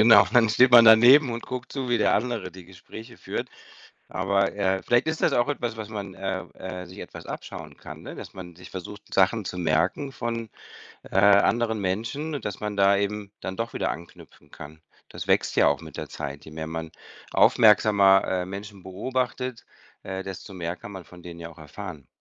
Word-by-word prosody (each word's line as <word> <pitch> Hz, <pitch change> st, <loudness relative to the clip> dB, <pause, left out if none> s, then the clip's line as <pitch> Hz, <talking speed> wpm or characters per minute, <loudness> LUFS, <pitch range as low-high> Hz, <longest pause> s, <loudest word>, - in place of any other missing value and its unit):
Genau, 110 Hz, -3 st, +8 dB
dann 120 Hz, -2 st, +5 dB
steht 125 Hz, +4 st, +4 dB
man 120 Hz, -1 st, +10 dB
daneben 120 Hz, +5 st, +8 dB
und 115 Hz, -, -5 dB
guckt 125 Hz, -1 st, -6 dB
zu, 135 Hz, -3 st, -4 dB
wie 120 Hz, -1 st, +2 dB
der -, -, +3 dB
andere 115 Hz, -4 st, -2 dB
die 90 Hz, 0 st, -13 dB
Gespräche 105 Hz, +6 st, -12 dB
führt. -, -, -5 dB, 0.6 s
Aber, 100 Hz, +2 st, 0 dB
äh, 95 Hz, -2 st, 0 dB
vielleicht 120 Hz, +4 st, +2 dB
ist 160 Hz, 0 st, -2 dB
das -, -, +3 dB
auch 120 Hz, -, +2 dB
etwas, 120 Hz, -5 st, -3 dB
was 110 Hz, -2 st, -6 dB
man 100 Hz, -3 st, -6 dB
äh, 95 Hz, -1 st, -3 dB
äh, 90 Hz, -1 st, -7 dB
sich 90 Hz, -, -13 dB
etwas -, -, -10 dB
abschauen -, -, -8 dB
kann, -, -, -11 dB
ne, -, -, -8 dB
dass -, -, -10 dB
man 90 Hz, -2 st, -9 dB
sich 90 Hz, +2 st, -13 dB
versucht, 95 Hz, +2 st, -8 dB
Sachen 100 Hz, +3 st, +3 dB
zu 90 Hz, -, -5 dB
merken 90 Hz, -, 0 dB
von, 115 Hz, -2 st, -4 dB, 0.6 s
äh, -, -, -3 dB
anderen 110 Hz, +3 st, +4 dB
Menschen 115 Hz, +11 st, -3 dB
und 140 Hz, -, -5 dB
dass 105 Hz, -3 st, -4 dB
man 105 Hz, -1 st, -4 dB
da 100 Hz, 0 st, +4 dB
eben 100 Hz, 0 st, -3 dB
dann 95 Hz, 0 st, -5 dB
doch 115 Hz, +1 st, -4 dB
wieder -, -, -1 dB
anknüpfen 80 Hz, -3 st, -13 dB
kann. 80 Hz, +1 st, -11 dB, 0.3 s
Das -, -, -8 dB
wächst -, -, +2 dB
ja -, -, +5 dB
auch 70 Hz, 0 st, 0 dB
mit 80 Hz, -3 st, -11 dB
der -, -, -6 dB
Zeit. 70 Hz, +1 st, -7 dB
Je -, -, -11 dB
mehr 80 Hz, 0 st, -6 dB
man 80 Hz, 0 st, -5 dB, 0.4 s
aufmerksamer, 100 Hz, -3 st, +5 dB
äh, 90 Hz, -1 st, -1 dB
Menschen 100 Hz, +1 st, -8 dB
beobachtet, 125 Hz, +5 st, -3 dB, 0.4 s
äh, 95 Hz, 0 st, -5 dB
desto 95 Hz, +1 st, -8 dB
mehr 85 Hz, -2 st, -4 dB
kann 100 Hz, -, -10 dB
man 95 Hz, -3 st, -9 dB
von 90 Hz, +1 st, -15 dB
denen 85 Hz, -1 st, -10 dB
ja 85 Hz, -, -7 dB
auch 85 Hz, -, -16 dB
erfahren. 80 Hz, -2 st, -9 dB
100 Hz, 205 wpm, -25 LUFS, 90-115 Hz, 0.6 s, man